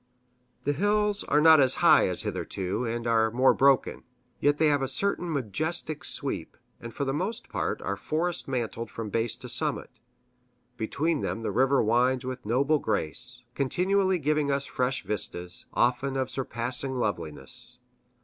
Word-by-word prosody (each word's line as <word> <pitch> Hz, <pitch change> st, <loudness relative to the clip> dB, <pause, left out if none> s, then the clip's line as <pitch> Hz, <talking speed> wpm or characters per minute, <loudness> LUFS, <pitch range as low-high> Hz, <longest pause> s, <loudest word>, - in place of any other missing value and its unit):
The 145 Hz, -, +1 dB
hills 205 Hz, +4 st, +1 dB
are 150 Hz, -, +3 dB
not 160 Hz, 0 st, +8 dB
as 130 Hz, -2 st, +5 dB
high -, -, +5 dB
as -, -, -1 dB
hitherto, 95 Hz, +6 st, -3 dB
and 115 Hz, +1 st, -3 dB
are 115 Hz, -1 st, +3 dB
more 125 Hz, +4 st, +4 dB
broken. 135 Hz, -1 st, +3 dB, 0.4 s
Yet 145 Hz, 0 st, +2 dB
they 160 Hz, -, +3 dB
have 145 Hz, -2 st, +3 dB
a 135 Hz, -, 0 dB
certain 175 Hz, +4 st, 0 dB
majestic 155 Hz, -, -2 dB
sweep, -, -, -1 dB, 0.2 s
and 115 Hz, -, -8 dB
for 140 Hz, -, -3 dB
the 135 Hz, -, -1 dB
most 190 Hz, +10 st, -3 dB
part -, -, -2 dB
are -, -, -2 dB
forest 170 Hz, +3 st, -2 dB
mantled 115 Hz, -3 st, -3 dB
from 110 Hz, -2 st, -6 dB
base 115 Hz, +1 st, 0 dB
to -, -, -10 dB
summit. -, -, -1 dB, 0.8 s
Between 145 Hz, +8 st, -1 dB
them 115 Hz, -, -3 dB
the -, -, -1 dB
river 135 Hz, +1 st, +3 dB
winds 125 Hz, +3 st, +2 dB
with 130 Hz, -3 st, -6 dB
noble 140 Hz, +6 st, +2 dB
grace, 125 Hz, -, -3 dB
continually 185 Hz, +8 st, +1 dB
giving 150 Hz, -1 st, 0 dB
us 140 Hz, 0 st, 0 dB
fresh 125 Hz, 0 st, -2 dB
vistas, 90 Hz, -4 st, -4 dB
often 130 Hz, +3 st, +1 dB
of 130 Hz, -1 st, -2 dB
surpassing 130 Hz, +1 st, -3 dB
loveliness. 85 Hz, -, -3 dB
130 Hz, 160 wpm, -27 LUFS, 120-150 Hz, 0.8 s, not